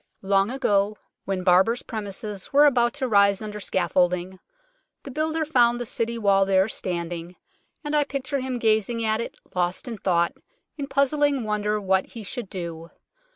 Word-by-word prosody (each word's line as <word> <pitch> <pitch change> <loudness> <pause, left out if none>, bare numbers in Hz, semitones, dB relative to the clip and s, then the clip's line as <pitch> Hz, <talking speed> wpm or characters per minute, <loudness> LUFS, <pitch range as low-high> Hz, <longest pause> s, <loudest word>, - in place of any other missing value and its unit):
Long 195 +1 +2
ago, 210 -5 +1 0.3
when 190 -2 -2
Barbers' 190 +6 +3
premises 205 -2 -6
22 - - -11
UNKNOWN - - -14
LONDON - - +3
were 295 - +8 0.2
about 240 0 +1
to 260 - -2
rise 200 -3 +4
under 210 -1 -6
scaffolding, 180 -1 0 0.6
the 275 - -8
builder 315 +3 -1
found 240 -5 +3
the 245 - -3
City 230 +1 -2
Wall 200 -3 +3
there 195 0 +3
standing, 175 -3 -4 0.5
and 295 0 -2
I 295 - +4
picture 275 0 -3
him 255 -1 -3
gazing 225 0 +1
at 220 +1 +1
it, - - -6 0.2
lost 180 +5 -1
in 230 -4 -5
thought, 170 -3 +1 0.4
in 280 -3 -5
puzzling 280 -1 +2
wonder 210 0 -1
what 190 -1 +1
he 230 - -7
should 220 0 -5
do. 170 -2 -6
210 Hz, 175 wpm, -24 LUFS, 190-245 Hz, 0.6 s, were